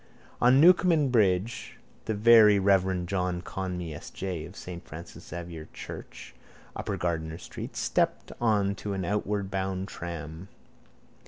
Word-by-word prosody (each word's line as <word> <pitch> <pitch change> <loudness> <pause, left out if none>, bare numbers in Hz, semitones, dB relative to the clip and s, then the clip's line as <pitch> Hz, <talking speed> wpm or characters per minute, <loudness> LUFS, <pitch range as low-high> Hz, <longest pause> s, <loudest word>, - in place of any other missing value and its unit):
On 125 +2 +6
Newcomen 170 -3 +5
bridge 105 -1 +1 0.3
the 110 - -1
very 110 -1 +7
reverend 95 -2 +2
John 90 -1 -1
Conmee 90 -4 -4
S. 75 - -9
J. 90 -5 -4
of 90 - -14
saint 90 -2 -8
Francis 80 +2 -10
Xavier's 85 -1 -7
church, - - -9 0.4
upper - - -3
Gardiner 80 -2 -2
street, - - -8
stepped - - 0
on 105 -4 +2
to 100 +1 -5
an 95 -2 -2
outward 100 +1 -1
bound 95 0 -2
tram. 85 +1 -7
95 Hz, 135 wpm, -28 LUFS, 85-105 Hz, 0.4 s, very